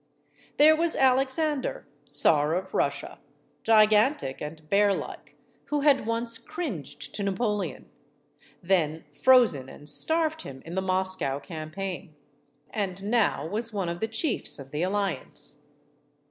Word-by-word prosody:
There 310 +2 +7
was 330 +1 +1
Alexander, 270 +2 +1 0.2
Czar 150 +1 +3
of 185 +1 -4
Russia, - - -2 0.4
gigantic 215 - +3
and 155 +1 -8
bearlike, 200 +2 0 0.3
who 295 -1 -1
had 280 -6 +3
once 230 0 0
cringed 255 - -6
to - - -4
Napoleon, 205 +1 -2 0.8
then 165 -4 +1
frozen 235 - +4
and 145 - -13
starved 320 - +2
him 135 -1 -10
in 165 - -8
the 190 - 0
Moscow 185 -6 -1
campaign, 165 +2 -6 0.6
and 195 -2 -3
now 215 -5 +1
was 225 +7 -4
one 195 -4 -2
of 170 0 -4
the 220 - -1
chiefs 225 +5 -1
of 135 -2 -11
the 150 - -3
alliance. 185 -6 -3
200 Hz, 125 wpm, -27 LUFS, 165-245 Hz, 0.8 s, There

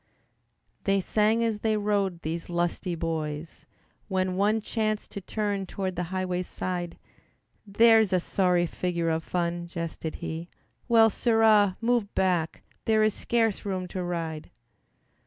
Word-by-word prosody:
They 195 0 +3
sang 215 +4 +2
as 225 -2 0
they 220 0 +1
rode, 200 -4 0
these 165 +2 -4
lusty 175 +1 -1
boys, 160 -1 -4 0.4
When 185 -1 0
one 205 +3 +2
chanced 215 -1 -2
to 200 - -6
turn 200 0 -2
toward 190 -1 -3
the 180 - -2
highway's 185 -1 -2
side, 175 -2 -4 0.7
"There's 220 0 +5
a 185 - +3
sorry 180 -1 +2
figure 170 -1 -1
of 160 0 -1
fun," 170 0 -2
jested 165 -2 -5
he, 165 +2 -5 0.4
"Well, 225 -2 +6
Sirrah! 220 -4 +4
move 230 -3 +1
back, 180 -4 0 0.2
there 220 -1 +3
is 215 -1 +3
scarce 225 -2 0
room 185 -2 -3
to 185 - -4
ride." 165 -3 -4
185 Hz, 140 wpm, -27 LUFS, 175-215 Hz, 0.7 s, Well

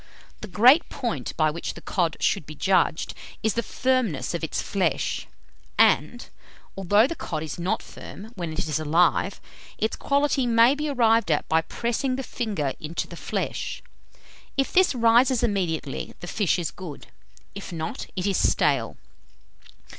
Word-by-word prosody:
The 215 - -7
great 245 - +5
point 165 - -4
by 155 -1 +3
which 170 - -5
the - - -9
cod 170 -4 -1
should 145 - 0
be 155 - -8
judged 185 -1 +1 0.3
is 220 -2 +2
the 235 - 0
firmness 245 - 0
of 170 - -3
its 160 - -2
flesh; 185 -6 -1 0.5
and, - - +3 0.5
although 205 +3 +4
the 285 - -2
cod 155 - -4
is 155 +2 -6
not 185 +6 -1
firm 215 +3 -11
when 175 -6 -5
it 155 - -7
is 155 0 -1
alive, 170 +4 +2 0.4
its 220 - -1
quality 280 -2 +1
may 230 +2 +5
be 300 +1 -3
arrived 230 -6 +3
at 150 - +1
by 160 0 +3
pressing 240 +9 -2
the 270 - -4
finger 200 - -2
into 155 +2 -4
the - - -10
flesh. - - -4 0.7
If 270 - 0
this 370 -6 +4
rises 240 +1 +4
immediately, 180 - -2
the - - -7
fish 190 +1 0
is 170 -4 -2
good; 175 -6 -9 0.5
if - - -8
not, 160 -1 -5
it 185 - -2
is 195 -2 +1
stale. - - +1
195 Hz, 160 wpm, -25 LUFS, 160-240 Hz, 0.7 s, great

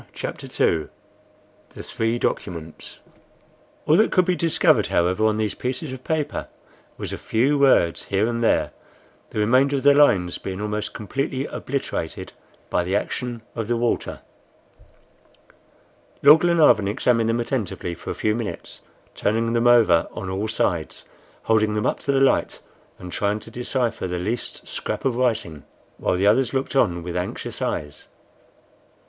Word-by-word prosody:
CHAPTER - - -6
II 80 -2 +1 0.9
THE - - -8
THREE 115 +1 -1
DOCUMENTS 85 -8 -4 0.8
ALL 155 - +4
that 220 - +3
could 185 - +3
be 180 0 +1
discovered, 165 -2 +2
however, 90 +5 +2
on 110 0 +1
these 110 -2 -1
pieces 130 +3 -4
of 130 -1 -9
paper 155 -2 -2 0.5
was - - -5
a - - -5
few 135 +6 +1
words 130 -12 +3
here 100 +2 +1
and 115 0 -2
there, - - +2 0.6
the - - -8
remainder 130 +6 +3
of 135 - -2
the 145 0 +7
lines 95 -12 +3
being 95 0 -5
almost 105 0 -3
completely 135 +5 -3
obliterated 130 - -4 0.4
by 90 - +1
the 95 +3 -1
action 120 +2 -3
of 115 -3 -4
the 120 0 0
water. 120 0 -2 2.0
Lord 150 +3 +8
Glenarvan 165 - +4
examined 115 +1 +1
them 115 +1 +1
attentively 115 -7 -3
for - - -9
a - - -3
few 105 - 0
minutes, 115 -1 -6 0.3
turning 115 +2 0
them 120 +1 +2
over 110 -9 +5
on 95 - -5
all 100 +3 -2
sides, 85 -7 -2 0.4
holding 110 -1 +2
them 105 - -1
up - - 0
to 140 - -1
the 135 - +2
light, 135 0 +2 0.4
and 90 -1 -9
trying 105 +3 -1
to 115 - -10
decipher 120 -3 -2
the 90 0 -3
least 110 +7 -4
scrap - - -4
of 130 -3 +1
writing, 110 - -1 0.4
while - - 0
the 95 +2 0
others 125 +6 +3
looked 135 +1 -2
on 85 -10 +2
with 85 0 -5
anxious 90 0 -4
eyes. 75 -1 -4
115 Hz, 155 wpm, -23 LUFS, 100-130 Hz, 2.0 s, Lord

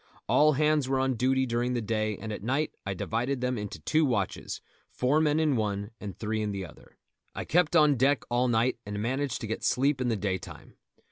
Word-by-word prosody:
All 155 +1 +5
hands 150 -1 +2
were 135 - +2
on 130 0 +1
duty 130 +2 +2
during 120 +1 -1
the 120 - 0
day, 110 -1 -1
and 110 +1 -5
at - - -6
night 135 +8 -1
I 95 - -2
divided 125 +8 -1
them 125 0 -1
into 105 -6 -5
two 155 - +2
watches, 105 - -1 0.3
four 140 +5 +1
men 150 0 +2
in 155 -4 +2
one 105 -1 -2
and 100 -3 -7
three 110 0 -2
in 105 - -1
the 95 -1 -4
other. 75 - -16 0.4
I - - -4
kept 175 0 +2
on 150 -4 +5
deck 135 +1 +3
all 120 +1 +1
night, 120 +1 +1
and 105 0 -5
managed 130 +5 -1
to 110 - -4
get 110 - -3
a - - -17
sleep 135 +1 +2
in 125 - 0
the 115 - +1
daytime. 95 -3 -5
125 Hz, 220 wpm, -28 LUFS, 105-140 Hz, 0.4 s, All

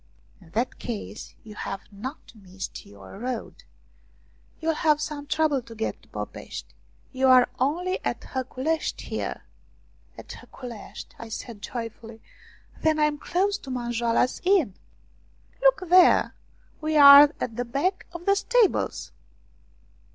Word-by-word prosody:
" - - -32
In - - -17
that 235 +4 -1
case 220 -2 -6
you 215 - -11
have 195 -1 -5
not 255 +10 -8
missed 190 -3 -9
your 100 - -12
road. 245 -1 -5 1.0
You'll 325 0 0
have 305 -1 +2
some 300 -1 -5
trouble 300 -3 +1
to 230 -1 -12
get 220 - -3
to - - -24
Popeshti - - -7 0.4
you 265 0 +1
are 255 -1 +7
only 350 +8 0
at - - -2
Haculeshti 265 +5 -3
here." - - -4 0.7
"At - - -11
Haculeshti? 240 -5 -10
" - - -28
I 230 - -8
said 220 -1 -7
joyfully. 230 -1 -7 0.3
" - - -25
Then 315 -1 +2
I 305 - +2
am 300 -1 +1
close 395 +5 0
to 270 - -11
Manjoala's 240 -1 0
Inn." 360 - +3 0.5
" - - -34
Look - - +3
there; 360 +1 +6 0.5
we 310 0 0
are 285 0 +10
at 230 - -3
the 245 - -1
back 290 +11 -1
of 345 0 -9
the 395 - +5
stables." 460 +1 +1
265 Hz, 145 wpm, -25 LUFS, 230-315 Hz, 1.0 s, are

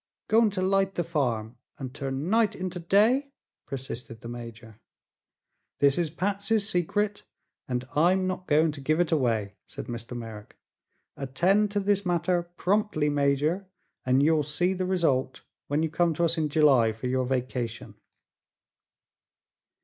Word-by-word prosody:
"Going 225 0 +4
to 185 - +1
light 195 0 +1
the 175 - 0
farm 120 -8 -2 0.2
and 130 -2 -6
turn 135 +1 -4
night 220 +1 +2
into 185 -1 -4
day?" 230 +11 +3 0.3
persisted 125 -4 -7
the - - -8
major. 115 -2 -9 1.0
"This 140 -1 +4
is 170 -2 0
Patsy's 200 +5 0
secret, 205 +2 0 0.5
and 125 0 -3
I'm 180 +5 +3
not 185 0 -3
going 155 +1 +3
to 145 -1 -9
give 155 +4 +1
it 175 -2 +1
away," 115 -9 0
said - - -8
Mr. 120 +1 -6
Merrick. 110 -3 -9 0.6
"Attend 180 +10 +1
to 205 - +1
this 200 0 +1
matter 175 0 +1
promptly, 175 -2 0
Major, 145 +6 +1 0.4
and 130 +2 +3
you'll 155 0 +4
see 150 +6 0
the 185 -1 -2
result 140 -8 0 0.3
when 145 +3 0
you 160 - 0
come 170 -1 +1
to 170 - 0
us 165 0 +2
in 155 -2 0
July 135 -7 +4
for 110 +3 -8
your 130 0 0
vacation." 125 -3 -3
155 Hz, 150 wpm, -27 LUFS, 130-185 Hz, 1.0 s, Going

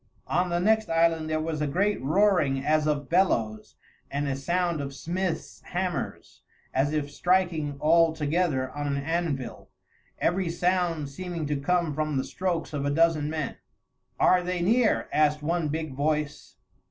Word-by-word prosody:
On 180 0 0
the 175 - 0
next 220 +4 +2
island 165 -1 +2
there 155 0 0
was 155 -1 -3
a 150 - +1
great 200 +8 0
roaring 150 -4 +2
as 155 0 +2
of 145 -2 -1
bellows 115 - +1 0.3
and 145 +1 -2
a 135 - -1
sound 170 +2 0
of 140 -1 -6
smiths' 175 +3 -3
hammers, 180 -1 -4 0.3
as 135 +2 +1
if 150 -2 -2
striking 175 -6 +1
all 165 +2 +4
together 155 -3 0
on 145 0 -4
an 140 -1 0
anvil, 150 -3 -3 0.5
every 180 0 0
sound 175 -3 0
seeming 170 +2 -5
to 150 0 -1
come 165 +2 0
from 155 -1 -1
the 130 - +1
strokes 175 -2 -3
of 145 -2 -2
a 145 - 0
dozen 155 0 +2
men. 155 -2 -3 0.6
"Are 180 0 +5
they 180 0 -2
near?" 225 +4 +2
asked 150 0 +2
one 165 0 0
big 155 -1 -3
voice. 145 -9 -2
155 Hz, 160 wpm, -27 LUFS, 145-175 Hz, 0.6 s, Are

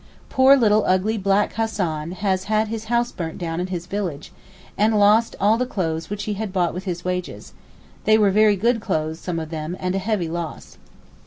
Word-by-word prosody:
Poor 265 +1 +6
little 215 -3 +3
ugly 185 +4 +2
black 195 0 +1
Hassan 180 -8 -2
has 190 -1 -1
had 215 0 +1
his 225 0 -5
house 240 +1 0
burnt 165 -3 -5
down 165 -1 -3
in 180 - -2
his 175 -2 -4
village, 180 -7 -4 0.4
and 215 +1 +2
lost 210 +3 +4
all 210 +4 +3
the 250 - +1
clothes 165 -8 -3
which 205 0 -4
he 210 - -2
had 210 0 -4
bought 180 -2 0
with 185 +3 -6
his 175 -2 -4
wages; 180 -1 -4 0.5
they 215 0 +5
were 205 -2 +4
very 210 +1 +4
good 230 +4 +1
clothes, 160 -5 -2
some 175 -1 -4
of 160 -1 -5
them, 160 +2 -4
and 180 0 -2
a 195 - 0
heavy 195 -3 -1
loss. 170 0 -6
195 Hz, 200 wpm, -22 LUFS, 175-215 Hz, 0.5 s, Poor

